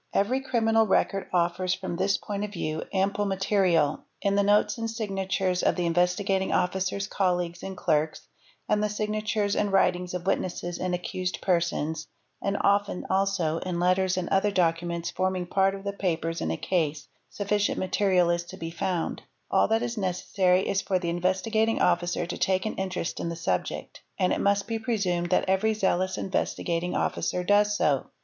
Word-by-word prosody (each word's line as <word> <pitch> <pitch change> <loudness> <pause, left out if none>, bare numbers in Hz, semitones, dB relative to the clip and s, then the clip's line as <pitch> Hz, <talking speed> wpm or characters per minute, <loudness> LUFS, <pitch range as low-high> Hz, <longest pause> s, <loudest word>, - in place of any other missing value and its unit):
_ - - -45 0.2
Every 250 +7 +1
criminal 225 -4 +2
record 195 0 +1
offers, 180 +1 +1
from 185 -1 -5
this 195 +3 +1
point 205 0 -4
of 210 - -4
view, 155 -5 -3
ample 200 +1 +1
material; 190 -5 +2 0.2
in 200 - +1
the 200 - +3
notes 205 +3 +3
and 225 0 -2
signatures 195 -4 -1
of - - +2
the 180 - -1
Investigating 180 +3 +1
Officer's 190 +2 0
colleagues 180 -3 -1
and 190 -1 -6
clerks, 155 -2 0 0.4
and 210 0 +2
the 210 - +1
signatures 210 0 -1
and 205 -1 0
writings 180 -2 +2
of 180 0 -4
witnesses 175 -2 -2
and 180 -1 0
accused 180 +1 -3
persons, 165 -3 0 0.3
and 200 0 -1
often 200 -2 +1
also, 190 -5 +1
in 180 -1 -3
letters 185 +1 +2
and 180 -2 -1
other 195 +2 +3
documents 170 -2 0
forming 185 0 -1
part 195 +2 +2
of 195 - -9
the 200 0 -3
papers 165 -4 -2
in - - -1
a 80 - -1
case, 155 -5 -1 0.2
sufficient 205 0 0
material 185 -2 +2
is 170 0 0
to - - -10
be 165 0 -5
found; 175 0 -2 0.3
all - - +4
that 225 +1 +1
is 240 -2 -3
necessary 185 0 +1
is 195 - +1
for 190 - 0
the 175 -2 -2
Investigating 190 +6 +1
Officer 175 0 +1
to 175 - -5
take 190 0 +1
an 215 - -1
interest 185 -3 -3
in 170 - -2
the 170 - -4
subject—and 165 - -2
it - - -1
must 200 0 +2
be 225 0 -3
presumed 190 -7 -1
that 180 - +2
every 205 +4 +2
zealous 190 -2 0
Investigating 175 -2 -1
Officer 180 - -1
does 205 +2 +3
so. 140 -4 +1
185 Hz, 175 wpm, -27 LUFS, 175-200 Hz, 0.4 s, all